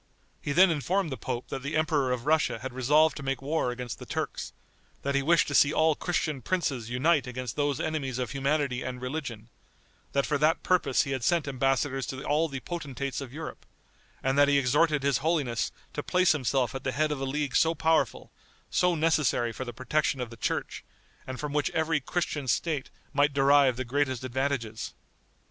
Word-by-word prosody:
He - - -3
then 180 +4 +6
informed 170 +3 0
the - - -2
pope 125 -2 -5
that 135 - -4
the 140 +3 -4
Emperor 150 -4 +1
of 125 -1 -2
Russia 155 0 +2
had 130 -1 -6
resolved 150 +5 +3
to - - -6
make 135 -1 -2
war 145 -1 -1
against 120 -4 -5
the - - -8
Turks, - - -3 0.5
that 140 - 0
he 140 - +2
wished 165 +4 +3
to - - -3
see 145 0 +5
all 160 0 +3
Christian 155 -4 -2
princes 135 -7 -1
unite 140 +4 +2
against 125 -1 -5
those 145 -2 0
enemies 140 -5 -2
of 125 -1 -2
humanity 140 -2 0
and 125 -1 -5
religion, 125 -4 -5 0.7
that 140 0 +2
for 145 -2 0
that 155 +2 +2
purpose 185 -1 +2
he 135 - -5
had 130 -2 -2
sent 165 +1 +2
embassadors 135 0 0
to 130 0 -5
all 155 +3 +2
the 135 -3 -6
potentates 140 -5 -4
of 135 -3 -7
Europe, 155 +3 -7 0.6
and 135 +2 +2
that 145 - +6
he 140 0 +4
exhorted 145 +2 +2
his 140 -3 +2
holiness 145 -6 0 0.2
to - - -2
place 180 -1 +3
himself 130 -3 0
at 135 - -5
the 130 - -1
head 155 +1 +1
of 145 -2 -3
a - - -1
league 140 0 -2
so 165 0 +4
powerful, 160 +1 +1 0.4
so 180 -1 +3
necessary 150 -7 +2
for 130 - -6
the 120 - -5
protection 135 +3 0
of 120 -2 -4
the - - -9
church, 115 - -3 0.4
and 130 -1 -5
from 150 -1 -4
which 150 -1 +1
every 160 -1 +2
Christian 145 -1 -2
State 145 +2 0 0.2
might 145 0 +3
derive 140 -2 +5
the 130 - -3
greatest 130 0 -1
advantages. 130 -4 -2
140 Hz, 200 wpm, -28 LUFS, 130-155 Hz, 0.7 s, then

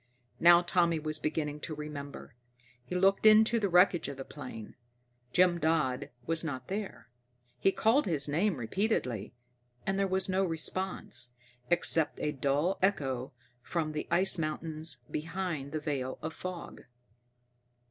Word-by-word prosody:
Now 175 +1 +7
Tommy 170 -1 +2
was 155 0 -1
beginning 150 -1 -2
to 155 +1 -6
remember. 145 -2 -8 0.5
He 180 - -6
looked 195 +3 +4
into 220 +2 +6
the 200 -3 0
wreckage 180 -2 +4
of 140 -1 -6
the 135 - -7
plane. 125 -7 -9 0.6
Jim 180 +1 +3
Dodd 150 -4 0 0.2
was 165 0 +2
not 130 -5 -5
there. 200 +1 -5 0.5
He 195 - +3
called 230 +8 +2
his 150 -5 +2
name 170 +6 +1
repeatedly, 125 - -2 0.5
and 195 0 -1
there 195 - +2
was 190 0 +1
no 190 0 +1
response, 165 -7 -2 0.3
except 165 -2 +4
a 150 - -1
dull 145 +6 0
echo 135 -10 0 0.3
from 155 +4 -2
the 150 0 -4
ice 185 +1 +3
mountains 155 -1 -3
behind 165 -3 -4
the 155 - -2
veil 140 -4 -3
of 160 +1 -4
fog. 185 -2 -8
160 Hz, 140 wpm, -30 LUFS, 145-185 Hz, 0.6 s, Now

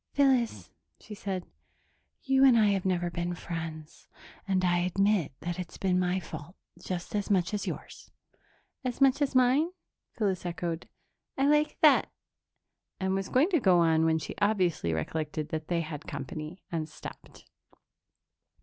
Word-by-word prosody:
"Phyllis," 245 - +2 0.3
she 215 - -10
said, 195 -3 -4 0.8
"you 270 -1 +3
and 260 -3 +7
I 215 -2 +5
have 195 -2 0
never 175 -2 0
been 175 0 -2
friends 160 -2 -7 0.4
and 185 -1 +1
I 175 0 +3
admit 190 -1 +1
that 175 +1 -4
it's 180 -2 -6
been 185 -2 +1
my 180 +1 +1
fault 170 0 -9 0.2
just 175 -2 -5
as 205 -1 -1
much 190 0 +2
as 205 - -2
yours." - - -7 0.7
"As 250 -1 -3
much 275 +1 +4
as 280 -2 0
mine?" 255 +6 +4 0.4
Phyllis 200 -5 -1
echoed. 170 -1 -4 0.5
"I 270 - +2
like 300 +1 +2
that - - +6 0.5
" - - -55
and 190 0 0
was 195 0 -2
going 295 +10 +3
to 335 - +4
go 190 -7 +4
on 160 -1 +4
when 160 0 +3
she 155 - -5
obviously 185 - +1
recollected 150 - -3
that 155 0 -4
they 170 -1 0
had 155 -2 -7
company, 155 +5 -6
and 160 -2 -2
stopped. - - -11
180 Hz, 160 wpm, -29 LUFS, 165-215 Hz, 0.8 s, and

